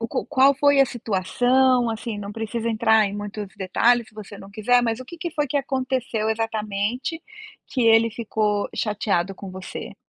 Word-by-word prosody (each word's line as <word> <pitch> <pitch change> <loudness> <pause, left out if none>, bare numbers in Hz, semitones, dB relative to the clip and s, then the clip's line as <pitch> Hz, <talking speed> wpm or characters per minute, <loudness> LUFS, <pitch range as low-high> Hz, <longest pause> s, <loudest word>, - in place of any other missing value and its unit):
o 230 - -2
q - - -2
qual 275 -1 +5
foi 285 0 +4
a 275 - +6
situação 245 +3 +1
assim, 225 -1 -4
não 205 0 -6
precisa 225 +1 -3
entrar 220 -1 +3
em 200 - -5
muitos 205 0 -5
detalhes 230 +5 +2
se 215 - -23
você 205 -1 -10
não 195 0 -12
quiser, 245 +4 +2
mas 230 0 -1
o - - -7
que 345 +6 -11
que 340 0 -4
foi 295 -2 0
que 285 - -2
aconteceu 260 -5 -1
exatamente 225 +6 -2 0.5
que 255 - -2
ele 225 0 +5
ficou 210 -2 -1
chateado 195 -3 -1
com 195 0 -9
você? 185 0 -8
225 Hz, 185 wpm, -23 LUFS, 210-255 Hz, 0.5 s, a